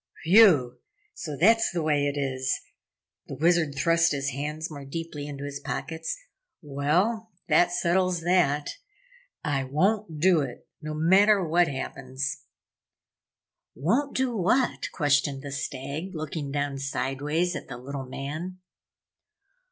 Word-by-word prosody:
"Whew 165 - +6 0.3
so 150 -4 -6
that's 225 +8 +4
the 170 -2 -2
way 145 -2 +2
it 145 0 -2
is?" 130 -1 -1 0.7
The - - -6
Wizard 165 -2 +2
thrust 165 +3 +3
his 140 0 -1
hands 150 +4 -4
more 145 -2 -8
deeply 150 0 -6
into 140 -1 -7
his 140 0 -5
pockets. 160 - -4 0.4
"Well, 175 +10 0 0.2
that 175 +3 +4
settles 175 0 +1
that! 160 -4 +2 0.7
I 145 -4 0
won't 165 +5 0
do 180 0 +5
it 130 -4 -6
no 155 0 -5
matter 190 +4 +4
what 175 +2 +3
happens!" 135 0 -4 1.3
"Won't 240 - 0
do 260 -2 0
what?" 225 +7 +1
questioned 145 -2 +1
the 140 - -6
Stag, 140 +6 -5
looking 155 -2 -4
down 145 -1 -2
sideways 140 +6 -1
at - - -6
the 125 - -7
little 135 +1 -6
man. 155 +8 -5
150 Hz, 130 wpm, -26 LUFS, 140-175 Hz, 1.3 s, Whew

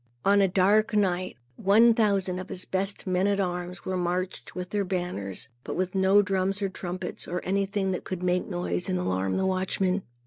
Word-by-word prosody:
On 200 0 +5
a 195 - +5
dark 200 +4 +3
night, 185 -5 +1 0.2
one 220 +4 +5
thousand 200 -5 +1
of 185 - -7
his 185 - -4
best 195 +1 -2
men 185 +1 +1
at 200 0 +1
arms 180 -1 -3
were 185 - -1
marched 180 +1 -2
with 180 0 -5
their 205 -1 +1
banners, 180 - -4 0.2
but - - -5
with 185 0 -1
no 195 +1 +5
drums 195 0 0
or 195 - +1
trumpets, 180 -1 -5
or 180 - -2
anything 195 0 0
that 180 - -3
could 180 -1 -5
make 180 0 +1
a - - -12
noise 90 0 -2
and 90 - +1
alarm 95 +1 0
the 190 - +1
watchmen. 190 0 0
185 Hz, 200 wpm, -27 LUFS, 180-195 Hz, 0.2 s, On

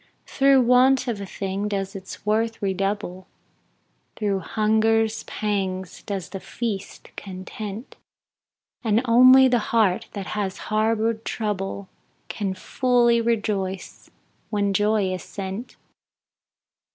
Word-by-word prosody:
Through 275 -1 +4
want 255 +2 +4
of 220 -4 -2
a 200 - -6
thing 195 +1 -3
does 195 -1 -3
its 190 +1 -9
worth 225 +2 0
redouble, 195 -1 -2 0.9
Through 200 -3 -1
hunger's 220 +3 +1
pangs 190 -3 -3
does 195 -5 -5
the 195 - -6
feast 215 -1 -6
content, 200 +4 -7 0.9
And 225 +1 +2
only 255 +3 +7
the 245 -2 +3
heart 215 -6 +2
that 200 -2 -5
has 200 -3 -2 0.2
harbored 220 +1 +1
trouble, 200 -3 -3 0.4
Can 195 -3 -3
fully 240 +3 +2
rejoice 205 -5 -2 0.4
when 200 -2 0
joy 205 -1 +2
is 185 - -4
sent. 195 +4 -6
210 Hz, 110 wpm, -24 LUFS, 195-230 Hz, 0.9 s, only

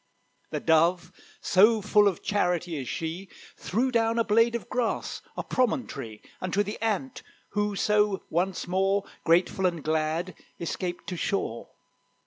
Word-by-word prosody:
The - - -2
Dove, 165 +2 +2 0.3
so 215 +4 +5
full 210 0 +4
of 190 -5 -1
charity 180 -4 0
is 130 - -5
she, 170 +4 -4 0.3
Threw 245 +7 -1
down 230 -1 +2
a 230 - +3
blade 230 +2 +3
of 235 - -4
grass, 245 -2 -2 0.2
a - - -2
promontory, 140 - -2 0.2
Unto 190 +3 +1
the 210 +2 -6
Ant, 225 +4 -1 0.3
who 205 0 -1
so 210 -1 +2
once 180 +3 -1
more, 195 +2 +1 0.2
Grateful 180 +3 +3
and 170 -4 -3
glad, 160 +3 -1 0.3
escaped 175 +1 -4
to 180 - -4
shore. 165 - -2
190 Hz, 140 wpm, -27 LUFS, 170-210 Hz, 0.3 s, so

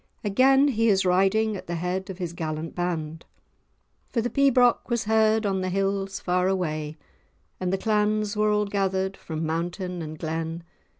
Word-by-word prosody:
Again 265 +7 +4
he 230 -3 +2
is 195 -2 +3
riding 195 +4 +2
at 190 - -8
the 175 - -3
head 180 +3 -3
of 190 - -6
his 175 -3 -4
gallant 155 -1 -4
band. 165 -3 -3 0.9
"For 235 - -1
the 240 +2 -1
pibroch 255 -4 +3
was 235 -2 0
heard 220 0 +3
on 195 -2 0
the 185 - -1
hills 195 +1 -1
far 180 0 +1
away, 155 -5 -2 0.6
And 185 -1 -1
the 195 - +1
clans 210 0 0
were 210 0 +2
all 210 0 +2
gathered 195 -1 -1
from 160 0 -5
mountain 175 +2 -3
and 155 -1 -6
glen. 165 +1 -4
190 Hz, 170 wpm, -25 LUFS, 170-215 Hz, 0.9 s, Again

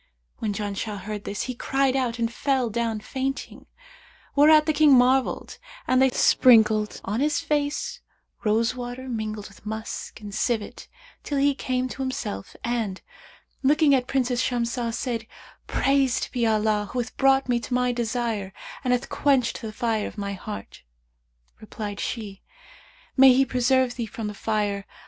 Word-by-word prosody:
When 215 - -1
Janshah 205 0 -4
heard 210 +1 -6
this, 200 - -3
he 255 - -4
cried 270 +1 0
out 250 -3 0
and 230 0 -1
fell 260 -4 0
down 225 -1 -1
fainting, 270 +4 -4 0.7
whereat 305 +1 +6
the 310 - +1
King 295 -2 +6
marvelled 255 +1 +2 0.3
and 255 0 +3
they 265 - +5
sprinkled 220 -4 +4
on 210 +4 -1
his 295 +2 +1
face 290 -1 -1 0.4
rose 225 +2 +2
water 250 +1 -6
mingled 215 -3 -4
with 195 - -18
musk 220 +1 -6
and 205 -2 -9
civet, 215 0 -2 0.3
till 290 - -3
he 280 +1 +3
came 255 -1 -2
to 270 - -6
himself 260 - -4
and, 225 -6 -2 0.6
looking 290 +1 +4
at 255 -2 +2
Princess 250 -2 0
Shamsah, 235 -1 -1
said, 235 -1 -3 0.4
'Praised 275 -2 +1
be 235 -2 +1
Allah 215 -1 +1
who - - -5
hath 240 -2 -3
brought 270 0 +3
me 245 -1 +2
to 240 - -6
my 250 0 +2
desire 230 -4 -2 0.3
and 250 -2 +2
hath 250 +1 -1
quenched 270 -4 +1
the 220 - -5
fire 220 -1 -1
of - - -10
my 200 -1 -3
heart!' 205 +2 -8 0.8
Replied 210 -1 -6
she, 205 -5 -5 0.7
'May 265 -1 +8
He 270 +2 +4
preserve 255 0 +1
thee 235 -2 -3
from 220 +1 -6
the 210 - -3
Fire! 205 -2 -2
240 Hz, 160 wpm, -25 LUFS, 215-265 Hz, 0.8 s, May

